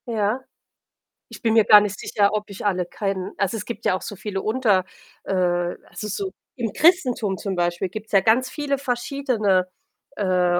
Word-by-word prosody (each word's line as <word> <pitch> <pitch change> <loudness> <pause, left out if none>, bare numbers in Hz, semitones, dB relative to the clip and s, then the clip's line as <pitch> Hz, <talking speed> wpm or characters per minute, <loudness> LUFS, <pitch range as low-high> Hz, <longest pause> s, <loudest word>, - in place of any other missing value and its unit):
Ja. 220 +2 0 0.9
Ich - - -10
bin 225 -1 +3
mir 225 -1 +6
gar 210 0 +9
nicht 205 -1 -3
sicher, 200 -1 +1
ob 210 0 -2
ich 200 +1 -8
alle 185 -3 +1
kenne 195 +1 -3
also, 200 +2 0
es 205 - -5
gibt 235 - -7
ja - - +3
auch 185 - -5
so 205 - -6
viele 195 0 -4
unter, 215 -4 +2 0.4
äh - - -2 0.5
also, 210 - -7
so 380 - -3 0.2
im 230 -6 -3
Christentum 250 - +3
zum 195 -1 -3
Beispiel 175 +1 0
gibt's 215 +3 -8
ja 195 - +6
ganz 235 +6 +3
viele 285 -1 -2
verschiedene, 240 -7 0 0.5
äh, 180 -3 +2
210 Hz, 180 wpm, -23 LUFS, 190-240 Hz, 0.9 s, gar